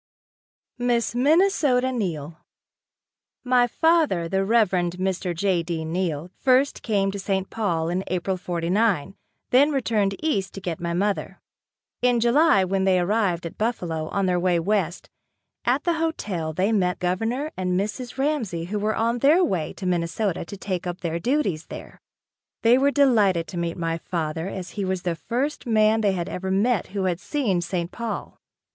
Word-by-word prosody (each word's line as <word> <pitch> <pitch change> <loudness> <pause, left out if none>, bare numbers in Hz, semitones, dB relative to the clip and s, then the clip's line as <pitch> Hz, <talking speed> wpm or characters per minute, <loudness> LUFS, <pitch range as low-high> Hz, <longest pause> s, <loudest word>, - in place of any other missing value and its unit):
Miss 240 -1 +1
Minnesota 280 -2 +3
Neill. 165 - -3 1.0
My 250 -1 +3
father, 310 - +2
the 195 +2 0
Reverend 195 -5 +2
Mr. 185 -1 -2
J. 185 0 +1
D. 165 -1 -4
Neill, 170 -1 -2
first 265 +1 +2
came 200 -3 +1
to 200 - -5
St. 195 -1 -2
Paul 170 -8 -1
in 180 +2 -1
April 185 +1 -1
'49, 180 +1 0 0.4
then 280 +4 +5
returned 220 -8 0
east 200 -12 -1
to - - -5
get 175 -4 -4
my 170 0 -2
mother. 200 +2 -1 0.6
In 245 -1 +3
July, 240 -1 +4
when 190 +1 0
they 190 -1 +3
arrived 180 -2 0
at 165 - -8
Buffalo 175 -9 -2
on 195 +3 -1
their 180 -1 +1
way 175 -1 +2
west, 185 -1 -1 0.6
at 255 +4 +2
the 345 - +2
hotel, 215 - -2
they 185 +7 0
met 180 -4 +1
Governor 225 +12 -1
and 180 -1 0
Mrs. 240 +6 -4
Ramsey 265 - -1
who 205 +4 -3
were 215 +1 0
on 230 +2 0
their 305 +8 +5
way 175 - -1
to 190 - -8
Minnesota 180 +2 -1
to 200 - -8
take 185 -2 -3
up 175 0 -5
their 170 -1 -2
duties 200 - 0
there. - - -10 0.6
They 230 +1 +6
were 275 +2 +3
delighted 215 - +3
to 180 - -6
meet 170 -1 -2
my 165 -1 -2
father 160 0 -3
as 190 -2 -6
he 205 - -3
was 185 -1 -2
the 175 - 0
first 250 - -3
man 220 -1 +3
they 200 -2 +2
had 175 -2 -3
ever 190 +1 -4
met 205 +2 +1
who 195 0 -3
had 180 -2 0
seen 205 - 0
St. 175 0 -3
Paul. 235 -2 -5
195 Hz, 170 wpm, -24 LUFS, 175-235 Hz, 1.0 s, They